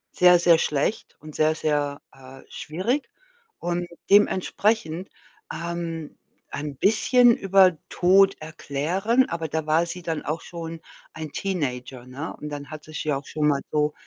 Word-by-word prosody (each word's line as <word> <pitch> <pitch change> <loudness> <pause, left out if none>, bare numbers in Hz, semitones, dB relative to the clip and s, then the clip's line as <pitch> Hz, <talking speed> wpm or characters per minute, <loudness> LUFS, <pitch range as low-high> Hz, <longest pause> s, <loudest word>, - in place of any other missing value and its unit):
sehr, 180 0 +7
sehr 170 -1 +5
schlecht 150 +8 -1
und 155 -1 -11
sehr, 155 0 +2
sehr, 145 -2 -1
äh, 135 0 -14
schwierig. 210 - -3 0.5
Und 175 0 -2 0.2
dementsprechend, 200 -3 +2 0.4
ähm, 170 -2 -5 0.3
ein 145 -1 -5
bisschen 240 +3 +4
über 190 -3 +4
Tod 195 +2 +4
erklären 170 - 0
aber 165 -1 -3
da 160 +1 -3
war 160 +2 +2
sie 180 0 -5
dann 165 -2 -3
auch 155 +2 -3
schon 165 -1 -8 0.3
ein 155 -2 -7
Teenager, 130 -9 -4
ne? 135 +6 -7
Und 150 - -6
dann 145 -1 -7
hat 155 -1 -9
sie 155 - -13
es - - -4
ja 150 -3 0
auch 140 - -9
schon 150 -1 0
mal 140 -2 +2
so 150 0 +1
160 Hz, 155 wpm, -24 LUFS, 150-180 Hz, 0.5 s, sehr